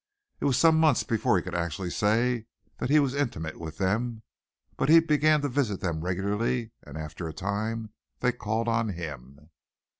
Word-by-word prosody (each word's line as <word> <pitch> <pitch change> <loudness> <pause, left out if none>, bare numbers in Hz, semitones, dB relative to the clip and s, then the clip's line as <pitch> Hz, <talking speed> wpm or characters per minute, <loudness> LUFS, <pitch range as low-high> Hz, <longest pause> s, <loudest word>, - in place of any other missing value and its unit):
It - - -2
was 135 -3 +3
some 160 -1 +5
months 155 -5 +4
before 110 -3 +2
he 90 - -1
could 90 - -6
actually 85 +1 -2
say 115 +3 +1 0.3
that - - -2
he 150 - +5
was 140 -3 +1
intimate 115 - -3
with 80 -1 -7
them, 110 +4 -1 0.5
but 135 - 0
he 165 +1 +9
began 155 -1 +3
to 145 - 0
visit 120 -7 0
them 80 -4 -2
regularly 105 +6 -1
and 75 +1 -10
after 80 +2 -6
a 80 - -6
time 110 +4 -3 0.3
they 125 - +2
called 115 -1 -2
on 115 -1 +1
him. 75 -4 -8
110 Hz, 180 wpm, -27 LUFS, 90-125 Hz, 0.5 s, he